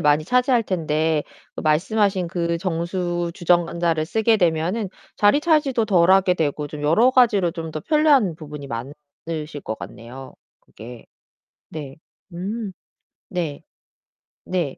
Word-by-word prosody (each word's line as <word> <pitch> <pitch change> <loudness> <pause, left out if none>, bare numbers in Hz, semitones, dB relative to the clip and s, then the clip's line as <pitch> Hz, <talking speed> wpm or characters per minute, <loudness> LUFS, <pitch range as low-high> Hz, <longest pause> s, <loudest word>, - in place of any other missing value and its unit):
많이 150 +1 +3
차지할 250 - +2
텐데 160 -4 0 0.3
말씀하신 185 +3 +1
그 170 -1 -1
정수 175 0 -2
주전자를 170 -2 +1
쓰게 220 +3 +2
되면은 180 +3 0 0.3
자리 205 +8 +4
차지도 295 -8 +2
덜하게 185 -1 +4
되고 150 -2 -2
좀 150 0 -8
여러 190 +12 +4
가지로 220 -9 +4
좀 165 -2 -6
더 155 - -4
편리한 290 - +3
부분이 150 -3 -9
많으실 145 +5 -7
것 110 - -4
같네요. 125 +4 -10 0.3
그게. 115 +1 -12 0.6
네. 145 -4 -8 0.4
음. 200 +4 -4 0.6
네. 165 -6 -4 0.8
네. 175 -7 -2
170 Hz, 245 characters per minute, -22 LUFS, 150-205 Hz, 0.8 s, 자리